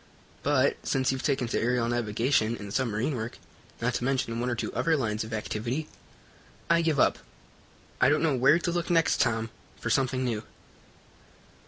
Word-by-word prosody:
But, 140 -1 +2
since 130 -1 +1
you've 130 -1 -3
taken 140 -4 0
to - - 0
aerial 120 0 +1
navigation 115 0 +1
and 100 -1 -8
submarine 125 +2 0
work, 110 0 -5 0.4
not 125 +2 0
to 120 - -2
mention 125 -3 0
one 125 +1 -1
or 120 - 0
two 120 - -4
other 165 -1 +2
lines 110 -5 -1
of 110 - -9
activity, 115 +7 -3 0.8
I 170 0 +5
give 160 -4 +1
up. - - +3 0.8
I - - +6
don't 150 +2 +2
know 155 -4 +2
where 135 +5 +5
to 175 0 -1
look 175 0 -2
next, 165 -2 +3
Tom, 115 -2 0 0.3
for 120 - -2
something 130 +1 +1
new." 115 -3 -2
125 Hz, 175 wpm, -28 LUFS, 115-140 Hz, 0.8 s, I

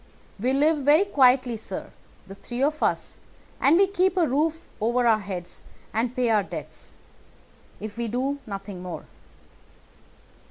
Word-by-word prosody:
We 250 +5 +1
live 300 +3 +3
very 295 +7 +4
quietly, 255 - +3
sir, 220 - -7 0.3
the 195 - -10
three 240 +6 -4
of 305 +2 0
us; - - -1 0.4
and 300 +4 +5
we 395 - +6
keep 380 -1 +1
a 340 -3 +4
roof 310 +4 0
over 240 +3 +1
our 225 -2 +4
heads 185 -3 -7 0.3
and 230 +3 -1
pay 245 -2 +1
our 215 -2 +4
debts, - - -8 0.8
if 215 0 -7
we 235 - -1
do 265 +5 -1
nothing 195 -2 -6
more. 180 -1 -6
250 Hz, 150 wpm, -25 LUFS, 215-300 Hz, 0.8 s, we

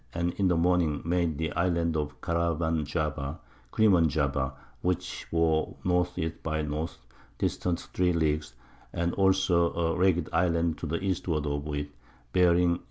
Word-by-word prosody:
and 85 +1 0
in 95 - +3
the 90 -2 +2
Morning 85 -3 +2
made 85 -3 0
the 80 0 -2
Islands 85 -1 +1
of 75 -1 -3
Caraman 85 -2 0
Java 75 -1 -2 0.3
[Crimon 95 -7 +4
Java], 70 -3 0 0.3
which 90 0 -2
bore 80 -1 +1
N. 90 -1 +3
E. 80 -2 0
by 80 -1 -2
N. 75 +2 -2 0.5
distant 90 -1 -1
3 90 -1 0
Leagues, 75 -4 0 0.4
as 85 0 0
also 95 -3 +3
a 80 -1 0
ragged 90 -3 +2
Island 85 -2 +1
to - - -4
the 85 +5 -2
Eastward 90 -5 -1
of 70 0 -2
it, 75 0 -4 0.4
bearing 90 -1 +4
E. - - -16
85 Hz, 155 wpm, -28 LUFS, 75-90 Hz, 0.5 s, Crimon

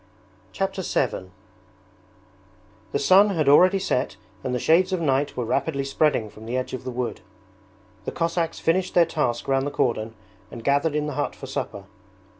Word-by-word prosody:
Chapter 195 0 -2
VII 120 - -1 1.6
The - - +1
sun 190 +8 +5
had 160 -7 0
already 180 +7 +6
set 135 -8 -1 0.3
and 130 - -2
the 125 - 0
shades 175 +8 +3
of 185 - 0
night 145 -2 0
were 125 - -1
rapidly 140 +3 -1
spreading 135 -4 +1
from 110 +1 -12
the 125 +2 -1
edge 130 - -3
of 130 - -6
the - - -3
wood. 125 -1 -4 0.8
The - - -3
Cossacks 165 0 -1
finished 180 +3 0
their 175 -1 +6
task 150 -7 -2
round 135 0 +1
the - - 0
cordon 115 -5 -1 0.3
and 115 - -9
gathered 145 +3 +2
in 150 0 0
the 150 - -3
hut 145 - -2
for - - -9
supper. 115 -6 -5
140 Hz, 175 wpm, -24 LUFS, 125-165 Hz, 1.6 s, already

